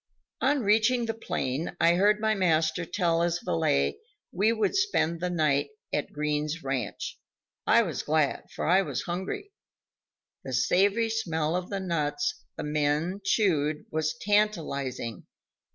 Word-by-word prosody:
On 280 -1 +2
reaching 225 +4 +3
the 225 - -2
plain, 165 - -3
I 170 - +5
heard 205 +4 +3
my 220 0 +2
master 165 -3 +1
tell 170 -3 +1
his 170 0 +1
valet 70 - 0 0.3
we 205 +5 +2
would 230 - 0
spend 380 - +1
that 180 +1 -2
night 150 -4 +1 0.2
at 150 - -1
Green's 150 +1 -2
ranch. 130 -6 -3 0.5
I - - +6
was - - -3
glad, 155 -2 0
for - - -3
I 185 +4 +5
was - - -3
hungry; 185 - -4 0.9
the 130 - -6
savory 200 - +2
smell 165 -7 -1
of 180 0 -3
the 200 - -2
nuts 185 - -1 0.2
the - - -4
men 150 +5 0
chewed 155 -8 +1
was 155 0 -1
tantalizing. 160 - -1
170 Hz, 140 wpm, -28 LUFS, 150-205 Hz, 0.9 s, I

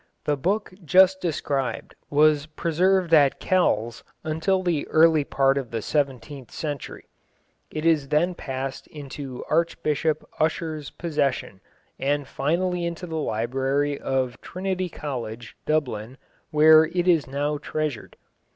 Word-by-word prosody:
The 150 - +2
book 195 +8 -1
just 190 +3 +5
described 140 -6 -2 0.2
was 150 0 +3
preserved 170 +3 +1
at 145 -4 +5
Kells 120 - +1 0.2
until 160 +5 0
the 170 -5 0
early 160 -1 +5
part 135 0 +2
of 130 -4 -7
the 115 -2 -4
seventeenth 135 -2 -2
century. 145 -3 -6 0.6
It 155 -3 +1
then 170 +5 +2
passed 135 -4 -5
into 140 -3 -8
Archbishop 155 -1 0
Ussher's 155 -2 -1
possession, 140 - -2 0.4
and 145 0 0
finally 175 +5 -1
into 170 +1 -4
the 165 -2 -6
library 135 +3 -1
of 130 -2 -2
Trinity 185 0 -3
College, 120 -7 -6
Dublin, 130 -6 -1 0.3
where 155 +1 +7
it 175 +2 -2
is 165 -5 +3
now 145 +2 -2
treasured. 155 -6 -4
150 Hz, 120 wpm, -24 LUFS, 135-165 Hz, 0.6 s, where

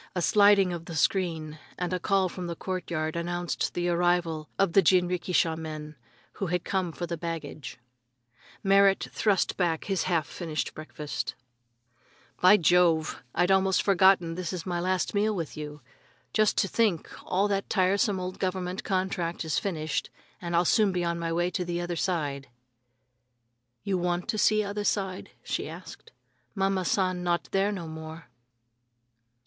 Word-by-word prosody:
A 180 - 0
sliding 200 -2 +5
of 170 -1 -6
the 170 - -7
screen 160 -3 0 0.2
and 180 0 -2
a 180 - 0
call 195 +1 +2
from 180 0 -6
the 170 - -4
court 185 +1 -4
yard 155 -1 -2
announced 175 +1 -2
the 175 0 0
arrival 170 -3 +1
of 195 -4 +2
the 195 - +7
jinrikisha 180 -2 +2
men, 155 -1 -7 0.5
who 195 - 0
had 180 0 -1
come 185 -3 -1
for 175 - -5
the 170 0 -4
baggage. 165 -5 -6 0.9
Merrit 195 0 +4
thrust 200 -4 +1
back 170 -4 0
his 195 -2 -1
half 165 -5 +1
finished 160 -2 -4
breakfast. 155 -1 -5 1.1
"By 185 +3 +8
Jove! 170 -3 +3
I'd 175 +2 +3
most 190 -1 +3
forgotten 190 -3 +4
this 175 -1 -4
is 180 -3 -5
my 175 -2 -2
last 185 +1 0
meal 210 +1 +1
with 165 -5 -4
you. 150 -1 -7 0.5
Just 215 -1 +3
to 195 - +3
think 205 -6 +1 0.2
all 195 +3 +1
that 195 -1 -1
tiresome 195 0 +2
old 185 0 -5
government 185 0 -2
contract 185 -3 -1
is 160 - 0
finished 160 -5 -2 0.3
and 170 -1 -3
I'll 175 +1 +3
soon 210 +2 +4
be 180 -1 -1
on 170 0 -1
my 165 0 -2
way 175 +2 0
to 180 - -1
the 175 0 -3
other 175 0 -3
side!" 150 -6 -2 1.4
"You 195 -3 0
want 175 0 -1
to 215 -2 0
see 215 0 +4
other 205 +1 -3
side?" 195 -3 -1
she - - -3
asked. 460 - -11 0.4
"Mama 195 -1 0
San 185 -1 +1
not 175 -1 -1
there 195 +1 +2
no 180 -5 -5
more." 160 -2 -9
180 Hz, 165 wpm, -28 LUFS, 165-190 Hz, 1.4 s, By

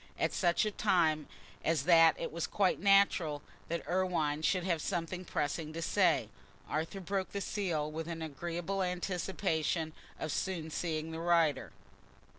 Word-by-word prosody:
At - - 0
such 175 +2 +2
a 215 - 0
time 165 -8 +2 0.4
as 165 -1 +1
that 165 -2 +6
it - - -3
was 170 0 -2
quite 195 -3 +1
natural 190 -6 +3 0.2
that 170 0 -3
Irwine 170 -5 0
should 180 +3 +1
have 170 -4 0
something 180 0 -3
pressing 155 -1 -2
to 165 - -4
say. 170 - +2 0.4
Arthur 160 +5 -2
broke 190 +1 -2
the 200 - -1
seal 175 -7 -2
with 160 +1 -5
an 165 -1 -4
agreeable 170 +5 -3
anticipation 175 -3 -1 0.3
of 155 - -3
soon 170 -4 -2
seeing 160 -1 -2
the 160 - -5
writer. 170 -3 +2
170 Hz, 150 wpm, -33 LUFS, 160-185 Hz, 0.4 s, that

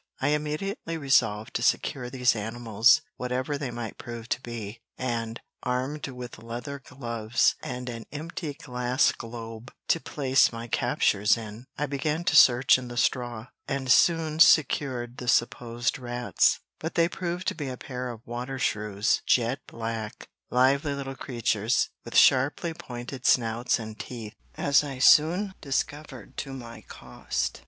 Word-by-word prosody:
I 140 - +1
immediately 155 - -2
resolved 115 -7 +2
to - - -1
secure 125 -3 0
these 125 -2 +2
animals, 115 +4 +3 0.2
whatever 130 +3 -2
they 140 -2 -3
might 120 -2 -6
prove 115 -1 -7
to 125 - -1
be, 115 -2 -7 0.2
and, 115 -2 -3 0.2
armed 130 +5 -2
with 125 -4 -8
leather 120 +5 -6
gloves, 115 -4 0
and 125 0 -5
an 115 -2 -6
empty 155 0 -5
glass 125 -2 +1
globe 115 0 -8 0.2
to - - +3
place 135 0 +2
my 115 0 -7
captures 115 -3 +2
in, 110 +2 -9
I 150 - 0
began 150 +4 -2
to - - +1
search 125 +1 +7
in 125 - -8
the 120 0 -8
straw, 120 -2 -1 0.2
and 135 -2 -1
soon 160 -1 +4
secured 130 -6 +4
the 125 - -7
supposed 120 +1 +1
rats, 120 -1 +1 0.2
but 160 - -5
they 170 -1 +4
proved 175 0 -4
to - - -4
be 145 - -5
a 130 - -6
pair 125 0 -5
of 115 -2 -9
water 125 +3 -5
shrews 105 -4 0
jet 120 +2 +2
black, 115 -2 -5 0.2
lively 140 +3 +2
little 135 -1 -5
creatures, 115 -3 0
with - - -2
sharply 145 +6 +4
pointed 125 -2 -6
snouts 115 0 +2
and 110 -2 -8
teeth, 115 -4 -7 0.2
as 140 +1 +4
I 140 -3 -5
soon 170 +9 +5
discovered 145 +1 -4
to 135 - -4
my 120 -3 -9
cost. 65 +1 -4
125 Hz, 150 wpm, -27 LUFS, 115-140 Hz, 0.2 s, search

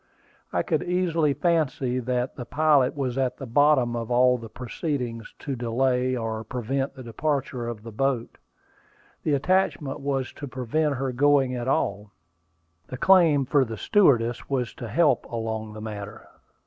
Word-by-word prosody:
I - - 0
could - - 0
easily 170 -5 +1
fancy 145 -5 0
that 125 +1 -2
the 125 - -6
pilot 145 -1 +3
was 135 -2 -2
at 130 -2 0
the 135 - -7
bottom 130 -1 +3
of 115 -1 -4
all 125 +1 +4
the 115 -1 -9
proceedings 125 -1 -4
to 140 - -4
delay 125 +2 0
or 110 -1 -3
prevent 130 +4 -3
the 130 - -9
departure 125 0 -2
of 115 -3 -6
the 115 - -8
boat. 125 +1 -2 0.8
The 150 - 0
attachment 150 -3 0
was 135 -2 -2
to 145 - -7
prevent 140 +4 -1
her 135 0 -2
going 135 0 +3
at 120 0 -4
all; 105 -5 0 0.8
the 130 - -6
claim 170 -5 +5
for 140 +2 +3
the 115 -3 -5
stewardess 120 - +2
was 130 -3 -1
to 120 - -7
help 140 +2 +2
along 110 -2 -4
the 110 - -8
matter. 105 0 -7
130 Hz, 160 wpm, -25 LUFS, 115-145 Hz, 0.8 s, claim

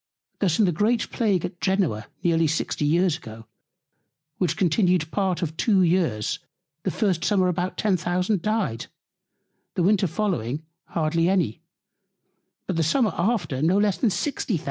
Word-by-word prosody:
Thus 180 -6 +2
in 215 - +4
the 180 - +2
great 215 +8 0
Plague 200 -7 +1
at 175 - -8
Genoa 180 - 0 0.2
near 165 -2 +3
60 155 -1 -1
Years 170 +2 +2
ago, 110 -5 -11 0.9
which 170 -3 0
continued 180 -2 +2
part 190 -3 0
of 160 -1 -3
two 195 -2 +3
Years; 165 - +1 0.4
the 190 - -1
first 185 -3 0
Summer 190 -2 +2
about 180 +1 -2
10,000 180 0 0
dyed; 210 - -1 0.9
the 180 - +1
Winter 195 +1 +3
following 155 - -2 0.2
hardly 165 +1 0
any; 180 - 0 1.0
but 185 - -2
the - - +2
Summer 215 - +2
after 175 - 0
no 170 +5 +3
less 205 -2 +2
than 235 - +3
60,000. 215 - -1
180 Hz, 145 wpm, -24 LUFS, 160-200 Hz, 1.0 s, in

